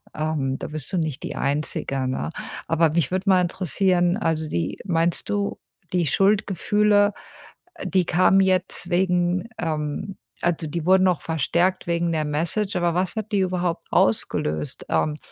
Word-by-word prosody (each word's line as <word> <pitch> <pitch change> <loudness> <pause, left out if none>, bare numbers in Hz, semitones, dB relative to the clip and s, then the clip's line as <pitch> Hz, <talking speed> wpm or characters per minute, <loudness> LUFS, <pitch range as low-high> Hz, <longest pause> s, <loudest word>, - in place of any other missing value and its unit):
ähm, 150 -4 -1
da - - -5
bist 155 0 -4
du - - +1
nicht 155 -5 -2
die - - -5
Einzige, 140 -2 0
ne? 130 +5 -3 0.4
Aber 165 0 +3
mich 170 +1 0
würde 190 +2 0
mal 185 -1 +5
interessieren, 180 0 +1
also, 160 -7 -1
die 85 - -2
meinst 170 -2 0
du, 205 -1 -1 0.3
die 175 -3 +2
Schuldgefühle, 205 +3 +2 0.6
äh, 305 - -6
die 185 -2 +2
kamen 185 +3 +4
jetzt 185 -1 0
wegen 180 +1 +1
ähm, 160 +4 -3 0.3
also, 165 -2 0
die 160 +1 -4
wurden 185 +1 +5
noch 180 -4 +2
verstärkt 170 +4 0
wegen 170 0 0
der 155 -1 0
Message, 170 +8 -1
aber 175 -1 +1
was 180 0 0
hat 220 0 -4
die 205 - +2
überhaupt 180 -2 -1
ausgelöst? 75 -8 0
Ähm, 150 -1 0
175 Hz, 155 wpm, -23 LUFS, 155-190 Hz, 0.6 s, mal